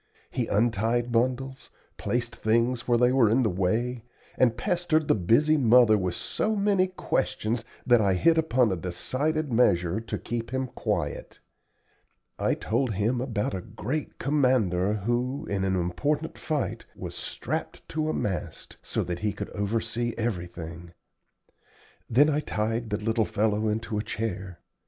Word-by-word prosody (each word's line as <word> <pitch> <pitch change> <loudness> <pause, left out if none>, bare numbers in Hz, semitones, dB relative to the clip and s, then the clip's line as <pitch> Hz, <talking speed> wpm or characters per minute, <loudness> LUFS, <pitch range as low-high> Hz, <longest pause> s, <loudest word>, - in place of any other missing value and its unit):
He 120 -3 -1
untied 115 +2 +1
bundles, 130 +3 -1 0.3
placed 120 -1 -2
things 115 +2 +1
where 120 -1 +4
they 125 +1 +4
were 130 -5 +4
in 125 +4 +3
the 110 - +1
way, 110 +7 -1 0.3
and 120 -2 +3
pestered 165 +1 +1
the - - +5
busy 120 - +3
mother 120 -4 +6
with 90 -4 -1
so 220 - -1
many 200 -2 +2
questions, 120 -10 -1 0.2
that 120 -2 +5
I 100 -2 +3
hit 165 - +4
upon 130 -8 +2
a - - +1
decided 130 - -2
measure 90 -4 +3
to 115 - -4
keep 115 -1 -4
him 130 +1 -1
quiet. - - -3 1.0
I - - +2
told 115 0 -1
him 115 +5 +1
about 115 -7 -2
a 95 - -3
great 115 +8 -4
commander 125 -10 +2
who, 120 +6 -1
in 100 -1 -2
an 95 0 +1
important 145 - -1
fight, 155 -3 -2
was - - -7
strapped - - -5
to 155 0 -1
a - - 0
mast, 90 -5 -4
so - - -2
that 90 0 -4
he 105 +1 0
could - - -6
oversee 115 +3 -2
everything. 85 -6 -4 1.2
Then 140 +6 +5
I 150 -1 +2
tied 115 -3 -2
the 105 - 0
little 110 +2 +1
fellow 105 +1 0
into 110 0 -2
a - - -2
chair. 105 -5 -4
115 Hz, 150 wpm, -27 LUFS, 105-130 Hz, 1.2 s, mother